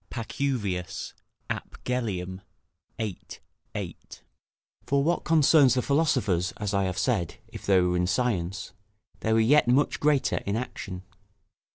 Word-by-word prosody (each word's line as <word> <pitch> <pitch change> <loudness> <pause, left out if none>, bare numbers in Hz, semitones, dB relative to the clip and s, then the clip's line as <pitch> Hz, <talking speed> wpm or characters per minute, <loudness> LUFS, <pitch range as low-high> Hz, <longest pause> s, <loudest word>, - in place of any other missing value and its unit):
Pacuvius, 115 -7 -3 0.3
ap - - -5
Gellium, 95 -7 -2 0.6
xiii. 105 -5 -3 0.6
8.] - - -7 0.7
For 140 0 +2
what 170 +4 +1
concerns 150 -5 +5
the 125 - +1
philosophers, 130 - +1
as 105 -1 -3
I 100 -1 +2
have 95 -1 -3
said, 105 -10 0
if - - -10
they 95 -2 +5
were 90 0 +1
in 90 0 +1
science, 95 -5 -1 0.5
they 110 - -1
were 110 - +4
yet 130 +5 +5
much 130 +4 +2
greater 145 -2 +2
in 100 - -2
action. 95 -6 -5
110 Hz, 135 wpm, -27 LUFS, 95-135 Hz, 0.7 s, concerns